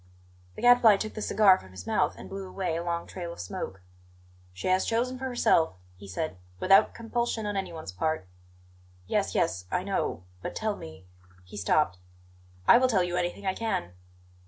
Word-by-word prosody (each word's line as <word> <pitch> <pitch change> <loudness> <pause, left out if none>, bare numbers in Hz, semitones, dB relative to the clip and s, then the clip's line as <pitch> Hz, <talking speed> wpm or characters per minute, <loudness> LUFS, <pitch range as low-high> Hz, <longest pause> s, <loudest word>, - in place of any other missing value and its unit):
The - - -8
Gadfly 245 -4 +7
took 215 +2 -4
the 215 - -6
cigar 200 -3 +5
from 95 - -14
his 95 -1 -10
mouth - - +1
and - - -9
blew 195 -1 -6
away 185 -4 -2
a 170 - -2
long 170 -1 -2
trail 175 -2 -6
of - - -10
smoke. 90 +1 -6 0.7
"She 90 - -5
has 185 0 +3
chosen 250 +3 -1
for 265 - -4
herself," 240 - +2 0.2
he 100 +2 -12
said, 100 - -4 0.2
"without 195 - +5
compulsion 230 -1 -2
on 205 0 -2
anyone's 170 - -4
part." 155 - -1 0.8
"Yes, - - 0
yes 90 0 0
I 180 - 0
know. 190 - -2 0.2
But - - -5
tell 215 -1 -1
me 80 - -11 0.2
" 90 0 -26
He 90 - -12
stopped. 105 -2 +1 0.7
"I - - +8
will 255 - +4
tell 200 -7 +3
you 175 0 -2
anything 180 +3 -2
I 190 - +1
can." 220 - -2
185 Hz, 185 wpm, -28 LUFS, -, 0.8 s, I